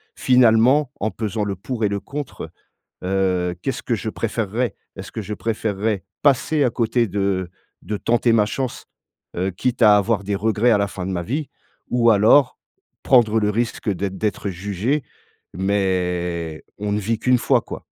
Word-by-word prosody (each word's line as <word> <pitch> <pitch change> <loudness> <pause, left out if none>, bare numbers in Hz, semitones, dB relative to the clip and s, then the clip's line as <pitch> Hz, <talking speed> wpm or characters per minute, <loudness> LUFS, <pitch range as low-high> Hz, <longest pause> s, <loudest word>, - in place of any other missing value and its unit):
Finalement, 125 +3 +4
en 110 - 0
pesant 110 -1 -3
le 100 -1 -2
pour 115 +5 -5
et 105 - +3
le 100 - -2
contre, 145 +5 -7 0.5
heu, 90 -2 0
qu'est-ce 135 - -3
que 120 - -1
je 110 - -4
préférerais? 115 +1 -2 0.2
Est-ce 95 - -9
que 115 - -4
je 105 +2 -5
préférerais, 105 -2 -2 0.2
passer 145 +2 +3
à 125 - +2
côté 115 0 +1
de 95 -2 -1 0.3
de 105 - -3
tenter 120 +1 +2
ma 110 -2 +4
chance, 130 +3 -4 0.5
heu, 95 +2 0
quitte 125 +7 -2
à 105 -2 +8
avoir 105 0 +1
des 100 +1 -1
regrets 110 +3 +2
à 105 - +4
la 100 - 0
fin 95 -2 -6
de - - -3
ma 85 -1 -2
vie? 140 - -3 0.4
Ou 120 -1 +4
alors, 115 +6 +5 0.4
prendre 110 -4 +4
le 105 - +1
risque 115 0 -1
d'être 95 0 -3
d'être 105 -1 -2
jugé. 100 - -2 0.5
Mais 90 -4 -1 0.2
on 105 0 -3
ne 105 - +1
vit 110 +2 -1
qu'1 125 +1 +3
fois, - - +3
quoi. - - -9
105 Hz, 175 wpm, -21 LUFS, 95-120 Hz, 0.5 s, à